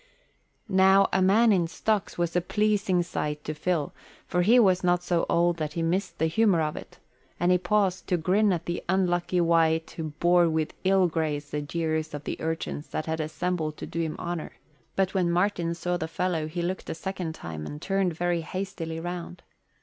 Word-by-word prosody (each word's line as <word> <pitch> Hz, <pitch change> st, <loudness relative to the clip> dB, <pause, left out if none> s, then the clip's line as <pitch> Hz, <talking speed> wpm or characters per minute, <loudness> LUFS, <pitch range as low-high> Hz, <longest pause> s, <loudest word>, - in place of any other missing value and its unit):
Now 190 Hz, 0 st, +5 dB
a 190 Hz, -, +3 dB
man 215 Hz, +5 st, +5 dB
in 180 Hz, -4 st, +2 dB
stocks 205 Hz, +5 st, -1 dB
was 170 Hz, -1 st, -1 dB
a 180 Hz, -, +3 dB
pleasing 200 Hz, -2 st, +1 dB
sight 150 Hz, -3 st, -3 dB
to 155 Hz, -, -3 dB
Phil, 155 Hz, -1 st, -1 dB, 0.3 s
for 180 Hz, -, 0 dB
he 220 Hz, +8 st, +5 dB
was 190 Hz, -6 st, +4 dB
not 175 Hz, 0 st, +2 dB
so 175 Hz, -1 st, 0 dB
old 170 Hz, 0 st, +2 dB
that 155 Hz, -2 st, -3 dB
he 165 Hz, -, -2 dB
missed 185 Hz, +4 st, -1 dB
the 160 Hz, -, +1 dB
humour 180 Hz, +2 st, +3 dB
of 155 Hz, -1 st, -1 dB
it, -, -, -10 dB, 0.4 s
and 175 Hz, +2 st, +3 dB
he 180 Hz, -, +4 dB
paused 185 Hz, -1 st, 0 dB
to 180 Hz, -, +2 dB
grin 195 Hz, +5 st, +2 dB
at 170 Hz, -2 st, -2 dB
the 175 Hz, -, -3 dB
unlucky 180 Hz, -1 st, +1 dB
wight 165 Hz, -1 st, +2 dB
who 160 Hz, -, -5 dB
bore 175 Hz, 0 st, +4 dB
with 160 Hz, -1 st, -1 dB
ill 190 Hz, 0 st, +4 dB
grace 150 Hz, -3 st, -2 dB
the 150 Hz, -, -2 dB
jeers 155 Hz, 0 st, -2 dB
of 145 Hz, -, -7 dB
the -, -, -5 dB
urchins 160 Hz, -2 st, -3 dB
that 155 Hz, -, -4 dB
had 160 Hz, 0 st, -2 dB
assembled 155 Hz, 0 st, -2 dB
to -, -, -6 dB
do 170 Hz, -, -5 dB
him 160 Hz, -2 st, -1 dB
honour; 175 Hz, -2 st, -4 dB, 0.4 s
but 190 Hz, -1 st, +1 dB
when 185 Hz, -3 st, +1 dB
Martin 175 Hz, -1 st, +1 dB
saw 175 Hz, +1 st, -1 dB
the 160 Hz, -, -3 dB
fellow 165 Hz, -1 st, -1 dB
he 170 Hz, +2 st, -3 dB
looked 185 Hz, +2 st, -3 dB
a -, -, -3 dB
second 175 Hz, -1 st, -4 dB
time 80 Hz, -, -7 dB
and 150 Hz, -, -7 dB
turned 195 Hz, -1 st, 0 dB
very 175 Hz, 0 st, 0 dB
hastily 165 Hz, -1 st, -5 dB
round. 175 Hz, +1 st, -6 dB
175 Hz, 200 wpm, -27 LUFS, 160-185 Hz, 0.4 s, Now